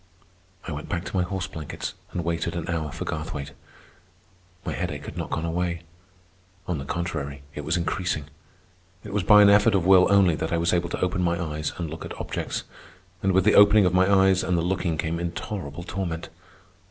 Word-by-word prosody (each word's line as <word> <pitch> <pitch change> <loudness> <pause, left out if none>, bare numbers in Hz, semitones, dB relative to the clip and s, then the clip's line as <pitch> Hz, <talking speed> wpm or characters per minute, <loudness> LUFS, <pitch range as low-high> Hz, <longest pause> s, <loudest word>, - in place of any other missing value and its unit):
I - - -4
went 75 0 -6
back 90 +1 -2
to - - -6
my 95 - +3
horse 95 +1 -2
blankets 80 -2 -6 0.2
and 85 - -3
waited 85 0 -2
an 85 - -4
hour 80 -3 -2
for - - -5
Garthwaite. 75 -2 -4 1.1
My - - -2
headache - - -4
had - - -8
not - - -4
gone 80 - -2
away. 85 0 -2 0.8
On 85 -5 -1
the 70 - -6
contrary, 70 -5 -4
it 75 - -5
was 80 +4 0
increasing. 85 -3 -1 0.8
It 105 - -8
was 105 - +1
by 105 +3 +7
an 100 - +7
effort 105 +1 +5
of 90 -3 +1
will 95 -1 +7
only 100 -4 +5
that 80 - -3
I 85 - +2
was 85 +1 +1
able 85 -1 +1
to - - -4
open 90 0 0
my 85 -1 +1
eyes 75 -3 -3
and 85 - -3
look 80 +1 -7
at - - -8
objects. - - -3 0.6
And 95 - +2
with 95 0 +3
the 105 - +5
opening 105 0 +7
of 90 - +2
my 95 +2 +4
eyes 95 -1 +4
and 90 -2 +1
the 85 - +1
looking 90 -2 -1
came 80 +1 -2
intolerable 85 -2 -5
torment. 85 -3 -4
85 Hz, 205 wpm, -25 LUFS, 80-95 Hz, 1.1 s, by